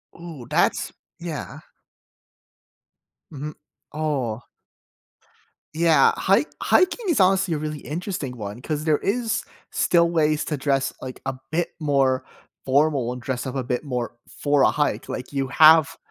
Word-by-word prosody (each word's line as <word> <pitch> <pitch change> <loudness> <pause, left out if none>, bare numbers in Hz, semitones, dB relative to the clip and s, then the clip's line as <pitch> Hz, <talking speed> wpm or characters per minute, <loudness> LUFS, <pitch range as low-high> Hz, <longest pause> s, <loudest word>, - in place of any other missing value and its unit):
Ooh, 165 -8 -9
that's - - +1 0.3
yeah. 145 - -6 1.7
Mhm 150 +1 -6 0.4
oh. 135 -7 -2 1.3
Yeah, 165 -1 +5
hik - - +3 0.2
hiking 375 +2 +2
is 295 - +2
honestly 190 -2 +3
a - - -1
really 150 0 -4
interesting 150 - -5
one 105 +3 -7
'cause 150 +1 -3
there 155 -2 +2
is 225 +1 -1 0.3
still 170 -1 +3
ways 155 -2 +1
to 150 - -2
dress, 135 0 0
like, 130 -1 -7
a 135 -1 -2 0.2
bit 170 +2 -1
more 135 -4 +2 0.4
formal 135 -2 +2
and 125 - -6
dress 130 +1 -3
up 130 - -5
a 130 - -1
bit 125 +2 -2
more 125 -4 -4
for 145 -1 +1
a - - +6
hike. 150 -1 -1
Like, 130 +3 -6
you 135 -1 -1
have 160 0 +6
150 Hz, 140 wpm, -23 LUFS, 130-160 Hz, 1.7 s, a